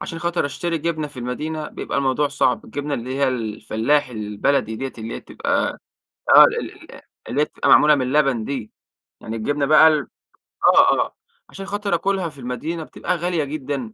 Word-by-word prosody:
عشان 165 - -6
خاطر 170 -2 -1
أشتري 165 +3 -3
جبنة 155 -1 -2
في 140 -3 -13
المدينة؛ 150 +6 -4
بيبقى - - -3
الموضوع 140 +1 +1
صعب، 130 -3 0
الجبنة 145 +4 -4
اللي 125 +2 -5
هي 140 -1 +2
الفلاحي 115 +3 -1
البلدي 110 +2 -1
ديَّة، 135 +3 -5
اللي 110 +1 -6
هي - - -6
بتبقى - - -2 0.5
آه - - +10
ال - - 0 0.2
ال - - -12 0.3
اللي 140 - -1
هي - - +4
تبقى - - -3
معمولة 150 0 +7
من 140 - 0
اللبن 130 -3 +1
دي، 130 -4 -5 0.5
يعني 110 +1 -6
الجبنة 140 +6 -1
بقى 155 +2 +7
ال 155 -2 +1 0.7
آه - - +7
آه - - -4 0.3
عشان 195 0 -8
خاطر 205 -1 -1
آكلها 190 0 -1
في 145 -3 -16
المدينة 150 +7 -4
بتبقى 180 - -3
غالية 170 -2 -1
جدًا، 140 -5 -5
145 Hz, 180 wpm, -21 LUFS, 125-155 Hz, 0.7 s, آه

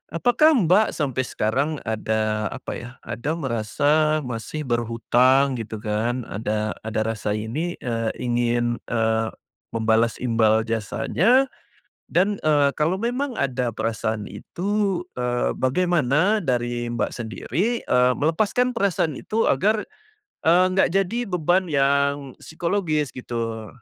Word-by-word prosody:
apakah 245 - +4
Mbak, 205 - +3
sampai 130 -4 -1
sekarang 130 +8 0
ada 110 -1 -1
apa 130 - -7
ya 120 - -8
ada 145 +7 -3
merasa 150 +4 +1
masih 125 +5 -5
berhutang 125 +2 +2
gitu 110 0 -5
kan 115 +3 -1
ada 105 0 -2 0.2
ada 110 0 0
rasa 110 -2 -2
ini, 135 +12 -3
eee, 115 -2 -1
ingin, 120 -1 0
eee, 110 -1 +1 0.5
membalas 115 +1 +2
imbal 110 -2 +2
jasanya, 140 - +1 0.6
dan, 195 +3 +1
eee, 145 -2 +3
kalau 155 +6 0
memang 245 +5 -2
ada 130 -2 0
perasaan 110 -1 -2
itu, 195 - -2
eee, 125 0 -1
bagaimana 175 - +2
dari 120 -3 -1
Mbak 120 -1 -2
sendiri, 160 - -2
eee, 125 0 +3
melepaskan 210 - +1
perasaan 195 -8 0
itu 225 +1 -1
agar, 210 +10 +2 0.6
eee, 175 +3 +6
enggak 190 +1 +3
jadi 220 +5 0
beban 180 +1 +1
yang 140 -2 +1
psikologis 160 -4 -1
gitu? 115 -3 -4
130 Hz, 120 wpm, -23 LUFS, 115-175 Hz, 0.6 s, eee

